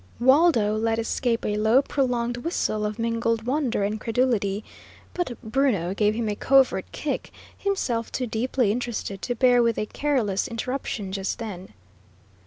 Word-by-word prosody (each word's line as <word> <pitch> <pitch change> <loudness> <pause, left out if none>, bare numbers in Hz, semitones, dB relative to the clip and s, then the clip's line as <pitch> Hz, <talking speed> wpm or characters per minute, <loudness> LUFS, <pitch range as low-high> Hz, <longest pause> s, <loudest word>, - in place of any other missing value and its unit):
Waldo 260 -5 +4
let 225 +1 0
escape 230 +1 -1
a 210 - 0
low, 220 +6 +4
prolonged 245 -4 -1
whistle 215 -7 -1
of 210 0 -5
mingled 230 -1 0
wonder 255 -4 0
and 205 +1 0
incredulity, 220 -3 0 0.5
but 345 -10 -3
Bruno 220 -7 +1
gave 210 +1 +1
him 230 -1 -1
a 210 - -1
covert 270 +3 +3
kick, - - -3 0.3
himself 255 - -1
too 255 - -2
deeply 235 0 0
interested 225 -4 -3
to 245 - -2
bear 245 0 +5
with 230 -1 +2
a 215 - -1
careless 230 -7 0
interruption 230 -4 -4
just 195 0 -2
then. 190 - -7
230 Hz, 150 wpm, -25 LUFS, 210-255 Hz, 0.5 s, bear